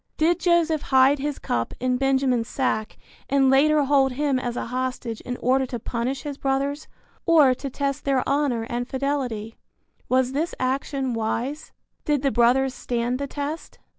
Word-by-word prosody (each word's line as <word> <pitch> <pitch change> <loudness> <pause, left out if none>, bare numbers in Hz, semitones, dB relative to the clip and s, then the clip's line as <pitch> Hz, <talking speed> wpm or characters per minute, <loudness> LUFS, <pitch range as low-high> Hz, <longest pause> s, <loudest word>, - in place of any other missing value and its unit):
Did 340 +3 +2
Joseph 335 -4 +2
hide 265 +2 +5
his 290 0 -2
cup 115 -1 -2
in 250 0 0
Benjamin's 265 -3 +1
sack 220 -5 -2 0.3
and 270 -1 +4
later 300 +2 +4
hold 270 -2 +3
him 280 -1 0
as 245 -1 -4
a - - -2
hostage 250 -2 -3
in 245 0 -5
order 260 +1 +1
to 245 - -4
punish 240 +4 -3
his 290 -2 -6
brothers 275 +2 -1 0.4
or 305 -6 +6
to 270 +2 -6
test 280 +1 -2
their 270 -2 +1
honor 275 -5 +1
and 240 +1 -3
fidelity? 260 -6 -3 0.5
Was 255 0 +2
this 310 +5 -2
action 265 0 -1
wise? 235 +6 -3 0.3
Did 295 -2 0
the 275 - +2
brothers 255 +2 +3
stand 245 +1 -2
the 280 - -3
test? 290 +3 -5
265 Hz, 165 wpm, -24 LUFS, 250-285 Hz, 0.5 s, or